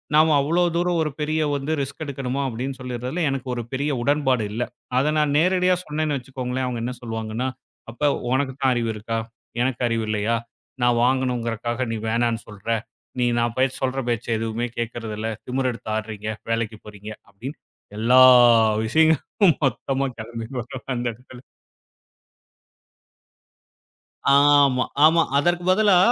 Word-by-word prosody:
நாம 155 Hz, 0 st, +5 dB
அவ்வளோ 170 Hz, +5 st, +2 dB
தூரம் 175 Hz, 0 st, +1 dB
ஒரு 150 Hz, -, -2 dB
பெரிய 155 Hz, +1 st, 0 dB
வந்து 140 Hz, +2 st, -3 dB
ரிஸ்க் 140 Hz, +3 st, -5 dB
எடுக்கணுமா 135 Hz, -1 st, -3 dB
அப்டின்னு 130 Hz, +2 st, -4 dB
சொல்லறதுல 125 Hz, +6 st, -4 dB
எனக்கு 135 Hz, -1 st, -4 dB
ஒரு 120 Hz, -, -3 dB
பெரிய 140 Hz, +3 st, -1 dB
உடன்பாடு 135 Hz, -3 st, +1 dB
இல்ல. 115 Hz, +3 st, -1 dB, 0.3 s
அத 140 Hz, +4 st, +2 dB
நான் 150 Hz, -2 st, +2 dB
நேரடியா 180 Hz, +2 st, +3 dB
சொன்னேன்னு 150 Hz, -1 st, -1 dB
வச்சுக்கோங்களேன், 130 Hz, 0 st, -4 dB
அவங்க 120 Hz, -2 st, -3 dB
என்ன 125 Hz, +2 st, -3 dB
சொல்லுவாங்கன்னா 115 Hz, +1 st, -3 dB, 0.4 s
அப்ப 135 Hz, +6 st, -2 dB, 0.3 s
உனக்குத்தான் 130 Hz, 0 st, +1 dB
அறிவு 120 Hz, -2 st, -1 dB
இருக்கா? 115 Hz, +2 st, -3 dB, 0.4 s
எனக்கு 125 Hz, -1 st, -1 dB
அறிவு 115 Hz, -1 st, -1 dB
இல்லையா? 110 Hz, +2 st, 0 dB, 0.5 s
நான் 120 Hz, -1 st, +3 dB
வாங்கணுங்கிறக்காக 125 Hz, -1 st, 0 dB
நீ 115 Hz, -, -2 dB
வேணான்னு 115 Hz, 0 st, 0 dB
சொல்ற, 105 Hz, +1 st, -9 dB, 0.5 s
நீ 125 Hz, -, +2 dB
நான் 120 Hz, 0 st, 0 dB
பேச்ச 130 Hz, 0 st, +2 dB
சொல்ற 130 Hz, +1 st, 0 dB
பேச்ச 115 Hz, -1 st, -1 dB
எதுவுமே 115 Hz, +2 st, -2 dB
கேக்குறது 115 Hz, -2 st, -4 dB
இல்ல, 110 Hz, +1 st, -2 dB, 0.2 s
திமிர் 130 Hz, +1 st, 0 dB
எடுத்து 115 Hz, -2 st, -7 dB
ஆட்றீங்க, 110 Hz, -1 st, -5 dB, 0.2 s
வேலைக்கு 115 Hz, -1 st, -2 dB
போறீங்க 105 Hz, 0 st, -9 dB, 0.2 s
அப்டின்னு 120 Hz, +9 st, -8 dB, 0.4 s
எல்லா 125 Hz, +3 st, +5 dB, 0.6 s
விஷயங்களும் 160 Hz, -, +3 dB
மொத்தமா 135 Hz, +1 st, -1 dB
கிளம்பி 115 Hz, 0 st, -6 dB
வரும் 125 Hz, +2 st, -9 dB
அந்த 120 Hz, 0 st, -2 dB
இடத்துல. 125 Hz, +2 st, -15 dB, 2.9 s
ஆமா 140 Hz, -2 st, +5 dB, 0.2 s
ஆமா. 165 Hz, +2 st, +5 dB, 0.2 s
அதற்குப் 175 Hz, +4 st, +1 dB
பதிலா 200 Hz, -1 st, +4 dB
130 Hz, 140 wpm, -23 LUFS, 115-145 Hz, 2.9 s, நாம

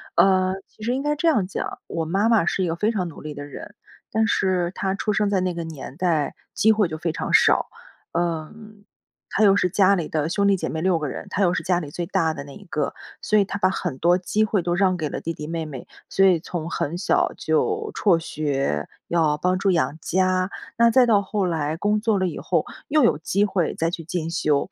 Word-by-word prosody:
呃， 185 Hz, -1 st, +4 dB
其 215 Hz, -, -15 dB
实 240 Hz, +3 st, 0 dB
应 265 Hz, -, -1 dB
该 295 Hz, +1 st, 0 dB
这 320 Hz, +3 st, 0 dB
样 220 Hz, -, +3 dB
讲， 190 Hz, -, -5 dB
我 165 Hz, -1 st, -3 dB
妈 195 Hz, +7 st, +1 dB
妈 220 Hz, -7 st, +4 dB
是 190 Hz, -, 0 dB
一 -, -, 0 dB
个 165 Hz, -, -1 dB
非 210 Hz, +6 st, +1 dB
常 185 Hz, -5 st, -2 dB
努 165 Hz, -, -10 dB
力 155 Hz, 0 st, -6 dB
的 145 Hz, 0 st, -7 dB
人， 175 Hz, +8 st, -10 dB, 0.4 s
但 220 Hz, 0 st, +2 dB
是 185 Hz, -3 st, +1 dB
她 190 Hz, -1 st, -1 dB
出 205 Hz, +2 st, -1 dB
生 210 Hz, 0 st, +1 dB
在 195 Hz, -2 st, +2 dB
那 185 Hz, -1 st, -1 dB
个 170 Hz, -, -3 dB
年 150 Hz, -3 st, -8 dB
代， 165 Hz, -5 st, 0 dB, 0.2 s
机 215 Hz, +2 st, +4 dB
会 215 Hz, -3 st, +2 dB
就 155 Hz, -1 st, -5 dB
非 170 Hz, -1 st, -1 dB
常 -, -, -4 dB
少。 -, -, +5 dB, 0.5 s
嗯， 175 Hz, +6 st, -4 dB, 0.5 s
她 215 Hz, -, +1 dB
又 200 Hz, -1 st, +6 dB
是 185 Hz, -, +2 dB
家 195 Hz, +2 st, +4 dB
里 170 Hz, -4 st, -2 dB
的 155 Hz, -1 st, -1 dB
兄 200 Hz, +3 st, +1 dB
弟 200 Hz, -, +4 dB
姐 -, -, -3 dB
妹 160 Hz, -, -3 dB
6 185 Hz, -1 st, +2 dB
个 155 Hz, -2 st, -3 dB
人， -, -, -6 dB
她 200 Hz, -, 0 dB
又 180 Hz, -1 st, +3 dB
是 -, -, -1 dB
家 180 Hz, -2 st, +1 dB
里 150 Hz, -4 st, -7 dB
最 175 Hz, +2 st, -3 dB
大 165 Hz, -4 st, +1 dB
的 140 Hz, -, -7 dB
那 140 Hz, -, -11 dB
一 205 Hz, -, -12 dB
个。 155 Hz, -4 st, -2 dB, 0.3 s
所 215 Hz, -, +2 dB
以 200 Hz, -, +4 dB
她 200 Hz, -, -5 dB
把 185 Hz, -, +3 dB
很 180 Hz, -7 st, -3 dB
多 175 Hz, +2 st, +4 dB
机 210 Hz, +4 st, 0 dB
会 210 Hz, -3 st, +1 dB
都 175 Hz, -, 0 dB
让 185 Hz, 0 st, +2 dB
给 155 Hz, -, -2 dB
了 -, -, -4 dB
弟 165 Hz, -, -3 dB
弟 150 Hz, -, -7 dB
妹 165 Hz, +1 st, -3 dB
妹。 135 Hz, -5 st, -8 dB, 0.2 s
所 195 Hz, -, +3 dB
以 180 Hz, -4 st, +5 dB
从 165 Hz, -1 st, -5 dB
很 165 Hz, +3 st, -2 dB
小 180 Hz, -, +1 dB
就 425 Hz, -, 0 dB
辍 190 Hz, -5 st, +3 dB
学， 140 Hz, -, -2 dB, 0.2 s
要 160 Hz, -3 st, +2 dB
帮 185 Hz, +3 st, 0 dB
助 195 Hz, 0 st, +1 dB
养 165 Hz, -3 st, +1 dB
家， 185 Hz, +1 st, +1 dB, 0.3 s
那 235 Hz, 0 st, +6 dB
再 250 Hz, +2 st, +5 dB
到 215 Hz, -4 st, +4 dB
后 200 Hz, 0 st, -1 dB
来 160 Hz, -2 st, -1 dB
工 210 Hz, +3 st, +1 dB
作 220 Hz, -2 st, +2 dB
了 185 Hz, -1 st, +1 dB
以 -, -, -5 dB
后， -, -, 0 dB, 0.2 s
又 300 Hz, +1 st, +3 dB
有 150 Hz, -, +3 dB
机 200 Hz, +5 st, +1 dB
会 185 Hz, -5 st, -1 dB
再 165 Hz, +1 st, 0 dB
去 165 Hz, -, -5 dB
进 165 Hz, 0 st, -3 dB
修。 150 Hz, -4 st, +1 dB
180 Hz, 260 characters per minute, -23 LUFS, 160-200 Hz, 0.5 s, 又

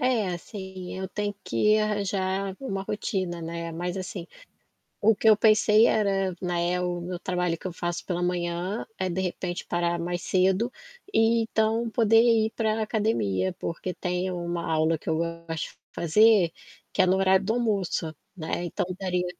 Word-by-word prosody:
É, 245 Hz, -6 st, +2 dB
assim, 185 Hz, 0 st, -6 dB
eu 190 Hz, 0 st, -4 dB
tenho 205 Hz, +1 st, -3 dB
que 210 Hz, -, +3 dB
arranjar 195 Hz, -2 st, -1 dB
uma 195 Hz, -8 st, -3 dB
rotina, 185 Hz, -4 st, -2 dB
né, 170 Hz, 0 st, -5 dB
mas 175 Hz, +2 st, -3 dB
assim, 185 Hz, -2 st, -5 dB, 0.7 s
o 220 Hz, +2 st, +5 dB
que 220 Hz, +2 st, +2 dB
eu 215 Hz, -, +7 dB
pensei 215 Hz, +1 st, +5 dB
era, 195 Hz, -4 st, +1 dB
né, 175 Hz, 0 st, 0 dB
o 180 Hz, -1 st, -2 dB
meu 175 Hz, 0 st, -5 dB
trabalho 180 Hz, -2 st, -1 dB
que 185 Hz, -, -6 dB
eu -, -, -7 dB
faço 175 Hz, +1 st, -3 dB
pela 175 Hz, -2 st, -2 dB
manhã, 175 Hz, +3 st, -1 dB
é 185 Hz, -, 0 dB
de 185 Hz, +1 st, -2 dB
repente 180 Hz, -1 st, -3 dB
parar 175 Hz, 0 st, 0 dB
mais 175 Hz, +1 st, -3 dB
cedo, 190 Hz, +7 st, +2 dB, 0.4 s
e 225 Hz, +1 st, +4 dB
então 225 Hz, +1 st, +1 dB
poder 225 Hz, 0 st, +4 dB
ir 225 Hz, -2 st, +4 dB
para 220 Hz, -1 st, +1 dB
academia, 205 Hz, -, 0 dB
porque 180 Hz, +2 st, -4 dB
tem 180 Hz, 0 st, -2 dB
uma 175 Hz, -1 st, -3 dB
aula 160 Hz, 0 st, +2 dB
que -, -, -9 dB
eu 160 Hz, 0 st, +1 dB
gosto 165 Hz, -1 st, -4 dB
de -, -, -37 dB
fazer, 200 Hz, +1 st, +4 dB, 0.4 s
que -, -, -1 dB
é 185 Hz, -, +6 dB
no 185 Hz, +1 st, +3 dB
horário 190 Hz, 0 st, +3 dB
do 215 Hz, -, +1 dB
almoço, 200 Hz, -9 st, 0 dB, 0.2 s
né, 165 Hz, +1 st, -3 dB
então 175 Hz, -, -2 dB
daria 180 Hz, -2 st, -1 dB
185 Hz, 170 wpm, -26 LUFS, 175-210 Hz, 0.7 s, eu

